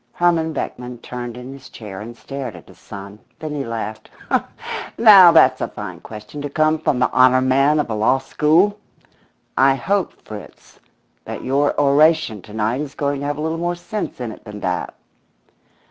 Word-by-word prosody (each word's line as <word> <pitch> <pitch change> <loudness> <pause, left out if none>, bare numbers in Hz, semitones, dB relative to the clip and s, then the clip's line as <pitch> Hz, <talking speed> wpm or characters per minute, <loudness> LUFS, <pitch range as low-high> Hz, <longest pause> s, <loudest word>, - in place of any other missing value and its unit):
Herman 170 -2 +2
Beckman 125 -4 -5
turned 120 0 -7
in 125 +2 -8
his 135 -1 -13
chair 105 -3 -9
and 115 +2 -9
stared 135 -6 -6
at 85 - -14
his - - -17
son. 100 +1 -10 0.2
Then 155 -1 -5
he 145 -2 -2
laughed. 110 -2 -5 0.9
"Now, 200 -6 +9
that's 165 - +5
a - - 0
fine - - -8
question 110 +7 -9
to 145 - -4
come 155 +2 +2
from 140 - 0
the 125 - +1
honour 130 0 +5
man 135 +4 +3
of 150 - 0
a 115 - -3
law 110 +5 +2
school! 165 +9 +2 0.8
I 135 0 +4
hope, 195 +9 -1
Fritz, 105 -1 -11 0.5
that - - -6
your 140 +3 +1
oration 145 - +3
to 105 - -14
night 110 +5 0
is 150 -1 -7
going 140 -1 -1
to 145 - -3
have 145 0 -2
a - - -4
little 160 +1 -2
more 175 +1 -1
sense 210 +1 -5
in 120 -3 -4
it - - -13
than 105 -1 -9
that." 90 -1 -2
135 Hz, 185 wpm, -20 LUFS, 115-155 Hz, 0.9 s, Now